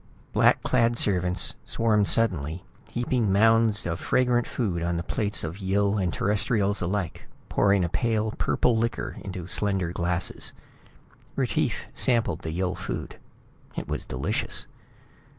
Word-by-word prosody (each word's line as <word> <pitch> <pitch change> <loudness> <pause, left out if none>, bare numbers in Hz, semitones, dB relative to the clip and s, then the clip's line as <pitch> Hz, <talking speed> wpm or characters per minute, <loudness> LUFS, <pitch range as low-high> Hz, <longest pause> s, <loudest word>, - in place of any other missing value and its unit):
Black - - +4
clad 115 0 +2
servants 90 -3 +2
swarmed 105 -3 +1
suddenly, 90 -6 +2 0.3
heaping 120 -3 0
mounds 110 +1 +4
of 85 -1 -2
fragrant 125 -1 +1
food 95 -9 -2
on 85 0 -1
the 85 - -3
plates 105 +3 +1
of 80 +5 -5
Yill 100 +1 +1
and 90 -3 0
Terrestrials 105 +2 0
alike, 90 -1 -3 0.2
pouring 100 -3 +3
a - - 0
pale 110 +3 0
purple 120 +2 +1
liquor 115 +1 -2
into 95 -3 -6
slender 95 -2 -1
glasses. 85 0 -2 0.8
Retief - - 0
sampled 120 -3 +2
the 80 - -5
Yill 90 +2 -1
food. - - -6 0.6
It - - -4
was - - -4
delicious. 65 +1 -2
100 Hz, 135 wpm, -26 LUFS, 90-115 Hz, 0.8 s, Black